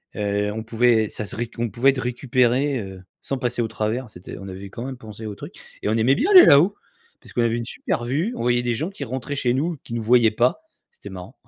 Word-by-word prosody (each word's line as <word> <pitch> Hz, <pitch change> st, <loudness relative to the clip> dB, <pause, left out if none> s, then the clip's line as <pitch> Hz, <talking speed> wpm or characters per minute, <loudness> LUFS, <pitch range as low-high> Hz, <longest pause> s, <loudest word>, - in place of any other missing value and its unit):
Heu, 105 Hz, 0 st, -1 dB
on 110 Hz, +1 st, -5 dB
pouvait 115 Hz, -1 st, +2 dB
ça 110 Hz, -, -5 dB
serait, 115 Hz, +3 st, -5 dB
on 120 Hz, 0 st, -1 dB
pouvait 120 Hz, +7 st, +3 dB
être 135 Hz, -1 st, -4 dB
récupéré, 125 Hz, +2 st, +1 dB
heu, 95 Hz, -3 st, -8 dB, 0.2 s
sans 135 Hz, -, -3 dB
passer 125 Hz, -1 st, -1 dB
au 115 Hz, -, 0 dB
travers. 110 Hz, +3 st, -3 dB
C'était 90 Hz, -3 st, -10 dB
on 100 Hz, -, -9 dB
avait 95 Hz, +1 st, -8 dB
quand 115 Hz, +5 st, -7 dB
même 130 Hz, -1 st, -6 dB
pensé 110 Hz, -2 st, -10 dB
au 105 Hz, -1 st, -5 dB
truc -, -, -10 dB, 0.3 s
et -, -, -1 dB
on 110 Hz, -, +1 dB
aimait 125 Hz, +5 st, +3 dB
bien 340 Hz, -, 0 dB
aller 370 Hz, -2 st, +10 dB
là-haut, 165 Hz, +9 st, +6 dB, 0.5 s
parce -, -, -16 dB
qu'on 120 Hz, -, +1 dB
avait 115 Hz, 0 st, +1 dB
une 115 Hz, -, -4 dB
super 120 Hz, -, -3 dB
vue, 160 Hz, -, -1 dB
on -, -, -5 dB
voyait 120 Hz, 0 st, +1 dB
des 120 Hz, -1 st, 0 dB
gens 155 Hz, +10 st, -2 dB
qui 195 Hz, -, -7 dB
rentraient 130 Hz, +4 st, -4 dB
chez 125 Hz, -3 st, +1 dB
nous, 155 Hz, +4 st, -1 dB
qui 115 Hz, -, -8 dB
nous 115 Hz, -, -2 dB
voyaient 115 Hz, -1 st, +5 dB
pas. 125 Hz, -, +1 dB, 0.3 s
C'était 475 Hz, -, -12 dB
marrant. -, -, -9 dB
120 Hz, 250 wpm, -22 LUFS, 110-130 Hz, 0.5 s, aller